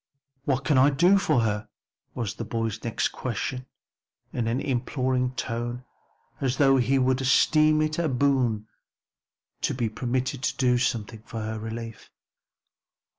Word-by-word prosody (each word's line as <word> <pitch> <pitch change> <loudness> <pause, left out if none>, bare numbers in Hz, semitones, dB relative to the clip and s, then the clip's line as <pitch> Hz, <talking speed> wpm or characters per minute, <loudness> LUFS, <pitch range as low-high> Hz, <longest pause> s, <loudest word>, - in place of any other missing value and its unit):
"What 135 -1 0
can 130 0 +3
I 135 +2 +6
do 175 +8 +4
for 130 - +2
her?" 105 -1 -1 0.5
was 115 -5 -2
the - - -6
boy's 115 -1 -3
next 115 - 0
question 130 +1 -4 0.7
in 120 -2 -1
an 120 +3 0
imploring 130 -1 -1
tone 120 +1 -4 0.5
as 130 -1 -1
though 135 -2 +5
he 130 +2 +2
would 130 0 +2
esteem 155 +3 +4
it 155 +1 -1
a 165 -2 +1
boon 125 -5 +1 1.0
to - - 0
be 120 -3 -1
permitted 125 +3 -2
to - - -1
do 125 -2 +3
something 115 -3 -2
for 115 - -5
her 110 0 -4
relief. 115 0 -7
125 Hz, 145 wpm, -26 LUFS, 115-135 Hz, 1.0 s, I